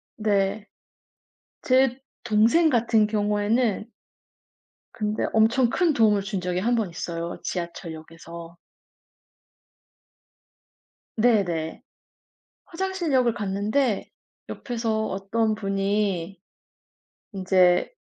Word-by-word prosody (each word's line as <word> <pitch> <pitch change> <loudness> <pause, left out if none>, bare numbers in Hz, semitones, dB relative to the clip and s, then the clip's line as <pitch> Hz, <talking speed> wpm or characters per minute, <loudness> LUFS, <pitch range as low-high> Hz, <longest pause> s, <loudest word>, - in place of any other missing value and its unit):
네. 205 -1 0 0.9
제 260 0 +2 0.2
동생 240 +9 +4
같은 230 -3 +3
경우에는 210 +2 0 1.1
근데 215 0 -2
엄청 230 +3 +3
큰 340 0 +2
도움을 210 -4 +3
준 195 -1 -3
적이 180 0 -2
1번 225 -2 0
있어요 170 0 -5
지하철역에서. 170 -1 -7 2.6
네네. 195 -9 +1 0.8
화장실 375 -3 -3
역을 245 -3 +3
갔는데 205 +4 -1 0.4
옆에서 225 -3 -2
어떤 215 +3 -1
분이 195 -3 -2 0.9
인제 185 -2 +3
210 Hz, 165 characters per minute, -24 LUFS, 190-235 Hz, 2.6 s, 동생